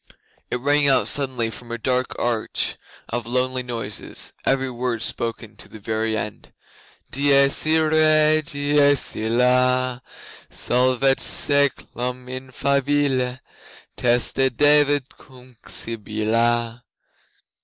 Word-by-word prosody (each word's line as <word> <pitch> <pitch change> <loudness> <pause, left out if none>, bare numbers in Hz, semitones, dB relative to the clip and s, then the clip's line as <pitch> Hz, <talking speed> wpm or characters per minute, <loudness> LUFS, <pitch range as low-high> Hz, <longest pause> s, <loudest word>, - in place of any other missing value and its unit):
It - - -1
rang 145 +3 +2
out 135 - +3
suddenly 130 -5 -2
from 115 +2 -10
a 120 - -3
dark 125 +2 -1
arch 115 -2 -1 0.3
of 115 -1 -3
lonely 130 +1 0
noises 115 -4 -6
every 135 -1 +1
word 120 -2 -3
spoken 115 -2 -3
to - - -10
the - - -11
very 110 +1 -2
end: 105 -2 -6 0.6
'Dies 140 +1 +3
Irae, 155 -1 +4
dies 145 -2 +1
illa, 125 +2 +1 0.5
Solvet 130 +2 +1
saeclum 125 -3 0
in 130 +1 -7
favilla, 135 -1 0 0.5
Teste 125 +2 +1
David 145 -1 +4 0.2
cum 125 -1 -17
Sibylla. 115 +2 -1
125 Hz, 100 wpm, -22 LUFS, 120-140 Hz, 0.6 s, Irae